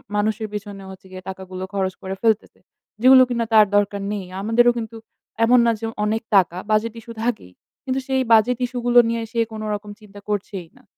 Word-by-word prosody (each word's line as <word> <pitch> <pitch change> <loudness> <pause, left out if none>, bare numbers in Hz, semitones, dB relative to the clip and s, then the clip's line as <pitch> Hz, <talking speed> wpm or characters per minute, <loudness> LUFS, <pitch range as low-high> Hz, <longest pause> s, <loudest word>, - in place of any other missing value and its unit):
মানুষের 215 +1 -1
পেছনের 200 -2 -7
হচ্ছে 190 0 -14
গিয়ে 185 0 -9
টাকাগুলো 185 -1 -7
খরচ 190 -1 -1
করে 190 0 -5
ফেলতেছে। 225 -2 0 0.4
যেগুলো 260 +1 +8
কিনা 235 -1 -1
তার 215 -1 +8
দরকার 205 0 +1
নেই। 200 -3 -4 0.2
আমাদেরও 235 +3 +4
কিন্তু 225 -1 -6 0.5
এমন 245 +2 +5
না 230 - +4
যে 225 - -4 0.2
অনেক 220 +1 0
টাকা, 180 -2 +3
বাজেট 215 +1 +1
ইশ্যু 230 +1 -11
থাকেই। 230 - -3 0.3
কিন্তু 265 0 -2
সেই 265 -1 +1
বাজেট 225 +2 +5
ইশ্যু 245 0 -5
গুলো 245 0 +6
নিয়ে 230 0 -1
সে 235 - -2
কোনরকম 210 -1 -5
চিন্তা 205 -1 -14
করছেই 195 -3 -4
না। - - -21
215 Hz, 185 wpm, -21 LUFS, 200-235 Hz, 0.5 s, যেগুলো